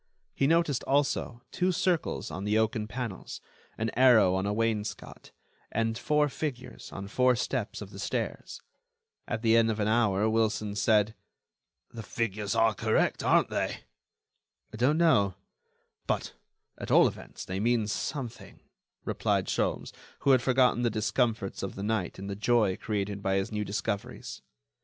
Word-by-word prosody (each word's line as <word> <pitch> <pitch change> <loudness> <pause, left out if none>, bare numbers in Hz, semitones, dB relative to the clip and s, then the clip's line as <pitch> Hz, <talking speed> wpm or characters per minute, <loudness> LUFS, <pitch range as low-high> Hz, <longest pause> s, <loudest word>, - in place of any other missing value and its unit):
He 135 - +1
noticed, 165 -4 +2
also, 135 -3 0
two 180 +1 +1
circles 175 - -1
on 90 +5 -5
the 105 +1 +1
oaken 110 -1 0
panels, 115 -3 -6 0.4
an 110 0 -1
arrow 120 -7 +5
on 95 +1 0
a - - 0
wainscot, 110 -1 -3 0.4
and 115 0 0
four 150 +4 +2
figures 130 -4 -6
on 100 0 -6
four 125 +4 +3
steps 120 -3 -3
of 100 - -12
the 100 - -10
stairs. - - -4 0.6
At 110 - -3
the 115 0 +4
end 115 0 +4
of 110 -1 -2
an 105 - +1
hour 110 -2 +2
Wilson 110 -2 0
said: 105 0 +3 0.8
"The 115 - -6
figures 105 -2 -2
are 115 -1 +4
correct, - - +1
aren't - - +3
they?" - - -2 0.9
"I - - -7
don't 130 +7 +3
know; 105 - +3 0.7
but, - - -1 0.5
at - - -6
all - - +6
events, - - -8
they 95 +1 -4
mean 115 0 +2
something," 120 +3 -5 0.5
replied - - 0
Sholmes, - - -1 0.3
who 140 - +4
had 130 -2 +5
forgotten 125 -1 +3
the 120 - +2
discomforts 110 -1 -1
of 95 - -5
the 100 - -5
night 105 -4 -1
in 95 - -7
the 100 0 -4
joy 105 -2 +2
created 100 -1 -3
by 95 0 0
his 95 +2 -1
new 105 -1 -2
discoveries. 100 0 -4
110 Hz, 155 wpm, -29 LUFS, 105-125 Hz, 0.9 s, all